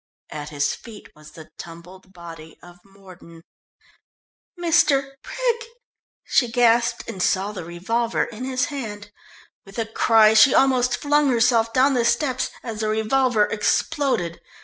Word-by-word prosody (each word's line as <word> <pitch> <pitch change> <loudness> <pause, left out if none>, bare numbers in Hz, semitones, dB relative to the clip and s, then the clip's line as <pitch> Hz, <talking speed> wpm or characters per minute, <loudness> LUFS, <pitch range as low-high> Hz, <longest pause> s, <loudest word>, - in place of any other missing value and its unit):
At 150 0 -7
his 145 -1 -1
feet 220 -3 -13
was 150 0 -16
the 155 -1 -14
tumbled 180 +3 -12
body 165 -3 -12
of 175 0 -16
Mordon. 185 -4 -16 1.2
"Mr. 305 -5 +2
Brig...!" 475 -2 -3 0.6
she 245 -3 +1
gasped, 235 0 +2
and 195 -5 -6
saw 195 +3 0
the 190 -4 -7
revolver 225 +8 -2
in 230 +2 -8
his 255 -1 -1
hand. 210 -6 -7 0.5
With 195 0 -14
a 225 - -1
cry 220 0 +4
she 220 +4 +6
almost 250 -2 +2
flung 295 0 +1
herself 230 -2 +2
down 265 +3 +3
the 245 -2 +1
steps 260 +2 0
as 225 -3 -6
the 215 -1 -1
revolver 220 +1 +1
exploded. 215 - -1
225 Hz, 140 wpm, -22 LUFS, 185-255 Hz, 1.2 s, she